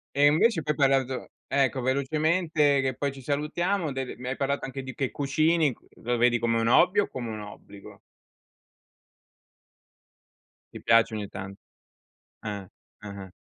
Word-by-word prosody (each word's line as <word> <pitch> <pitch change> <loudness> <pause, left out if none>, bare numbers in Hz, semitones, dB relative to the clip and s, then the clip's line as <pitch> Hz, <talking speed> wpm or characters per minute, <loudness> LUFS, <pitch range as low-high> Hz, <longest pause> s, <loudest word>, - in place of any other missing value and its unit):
E 140 +1 +4
invece 160 +5 +3
poi 150 - 0
hai 140 -2 +3
parlato 130 -1 -1 0.2
ecco 135 -2 +1
velocemente 150 +2 +1
che 130 -2 -1
poi 140 -1 -2
ci 135 0 -11
salutiamo, 155 +5 -1
delle 135 -1 -4
mi 125 +1 -6
hai 135 - -2
parlato 140 0 -1
anche 135 0 -6
di 130 0 -8
che 135 -4 -2
cucini, 155 0 +1 0.3
lo 120 +1 -1
vedi 120 0 +3
come 115 0 +1
un 115 - 0
hobby 180 - +5
o 205 - +2
come 120 -3 -5
un 110 -1 -5
obbligo? 105 -1 -12 2.7
Ti - - -9
piace 115 0 +4
ogni 105 -1 -4
tan 95 0 -7 0.9
Ah. 100 -3 -5 0.4
Ah-ah. 100 -2 -8
135 Hz, 150 wpm, -27 LUFS, 120-150 Hz, 2.7 s, hobby